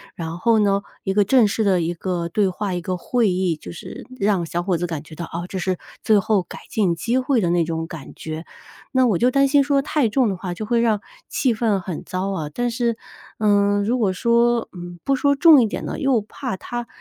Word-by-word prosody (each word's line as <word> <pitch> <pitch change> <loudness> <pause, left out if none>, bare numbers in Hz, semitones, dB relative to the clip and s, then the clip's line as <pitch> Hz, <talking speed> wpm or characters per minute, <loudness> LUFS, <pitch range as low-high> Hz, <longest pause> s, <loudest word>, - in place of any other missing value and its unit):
然 165 0 -5
后 230 +3 +3
呢， 200 -2 +2 0.2
一 190 - -1
个 205 +1 +4
正 230 +2 +4
式 220 +2 -1
的 190 -3 +3
一 170 +1 -1
个 175 0 -3
对 195 +3 +1
话、 190 +1 -3
一 175 - -2
个 180 +2 -3
会 230 +4 +1
议。 180 -2 0
就 155 - -10
是 220 +8 -9
让 195 -4 +1
小 170 +2 -3
伙 185 -1 0
子 175 +2 -2
感 160 -3 -5
觉 160 - -14
到， 170 - -5
哦， 170 +2 -5
这 190 - -4
是 185 0 -1 0.3
最 215 - +4
后 200 0 +2
改 175 - -10
进 195 -6 +1
机 235 +8 0
会 260 -1 +1
的 180 -5 +1
那 175 -1 +3
种 165 0 -3
感 160 -4 -9
觉。 160 +1 -6 0.5
那 260 -1 +3
我 215 -7 +2
就 245 +8 +3
担 275 +2 +3
心 280 +1 +4
说 280 0 +2
太 285 -5 +1
重 250 +3 +2
的 195 - -1
话， 180 -1 -4
就 215 - -5
会 235 +1 +1
让 220 -3 +2 0.3
气 255 -4 +1
氛 215 -3 +1
很 180 -3 -6
糟 185 +2 -3
啊， 160 -6 -3
但 245 0 -1
是， 235 -1 -1 0.4
嗯， 205 -1 +3
如 240 +5 0
果 205 -5 +2
说， 235 +3 +2
嗯， 175 -1 -9
不 275 - +2
说 280 +2 +2
重 295 -1 +7
一 230 - +2
点 - - -5
呢， - - -4
又 270 -5 +2
怕 240 +3 -5
他 240 +4 -5
205 Hz, 260 characters per minute, -22 LUFS, 175-235 Hz, 0.5 s, 重